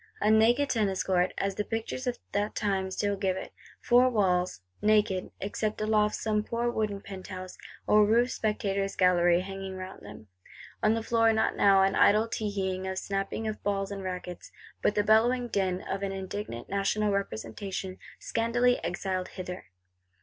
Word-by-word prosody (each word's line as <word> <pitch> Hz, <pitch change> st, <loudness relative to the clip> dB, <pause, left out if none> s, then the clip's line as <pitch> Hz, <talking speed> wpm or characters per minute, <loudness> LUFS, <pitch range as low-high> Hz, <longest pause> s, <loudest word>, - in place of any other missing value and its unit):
A 210 Hz, -, +3 dB
naked 235 Hz, +6 st, +4 dB
Tennis 205 Hz, -5 st, 0 dB
Court, 180 Hz, -1 st, +1 dB
as 195 Hz, 0 st, -1 dB
the 210 Hz, -, -2 dB
pictures 225 Hz, +4 st, -4 dB
of 245 Hz, -, -1 dB
that 205 Hz, +1 st, -1 dB
time 195 Hz, -2 st, 0 dB
still 205 Hz, +2 st, -1 dB
give 190 Hz, -1 st, -1 dB
it: -, -, -7 dB, 0.3 s
four 250 Hz, +1 st, +4 dB
walls; 185 Hz, -, +1 dB, 0.2 s
naked, 210 Hz, -3 st, +2 dB
except 210 Hz, +2 st, -2 dB
aloft 215 Hz, 0 st, +2 dB
some 215 Hz, -1 st, 0 dB
poor 235 Hz, +2 st, -1 dB
wooden 210 Hz, -3 st, -2 dB
penthouse, 185 Hz, -1 st, -8 dB, 0.3 s
or 210 Hz, 0 st, +5 dB
roofed 235 Hz, +4 st, +3 dB
spectators' 200 Hz, -3 st, -1 dB
gallery, 175 Hz, -1 st, +4 dB
hanging 195 Hz, 0 st, -6 dB
round 185 Hz, 0 st, -8 dB
them:—on 105 Hz, -, -5 dB
the 225 Hz, -, -2 dB
floor 230 Hz, 0 st, +3 dB
not 220 Hz, 0 st, +1 dB
now 195 Hz, -1 st, +5 dB
an 195 Hz, 0 st, +2 dB
idle 215 Hz, +2 st, +4 dB
teeheeing, 190 Hz, -4 st, -2 dB
a 190 Hz, -, -3 dB
snapping 195 Hz, +3 st, -3 dB
of 215 Hz, -, -4 dB
balls 195 Hz, -1 st, -1 dB
and 200 Hz, -1 st, -5 dB
rackets; 180 Hz, -1 st, -6 dB, 0.3 s
but 210 Hz, -, +2 dB
the 205 Hz, -, +2 dB
bellowing 240 Hz, +4 st, +3 dB
din 190 Hz, -4 st, -1 dB
of 195 Hz, -, -4 dB
an 195 Hz, -1 st, -2 dB
indignant 190 Hz, -, -5 dB
National 200 Hz, +1 st, 0 dB
Representation, 190 Hz, -, -4 dB, 0.2 s
scandalously 240 Hz, +1 st, +1 dB
exiled 185 Hz, +2 st, -2 dB
hither! 180 Hz, -1 st, -7 dB
200 Hz, 160 wpm, -28 LUFS, 190-215 Hz, 0.3 s, or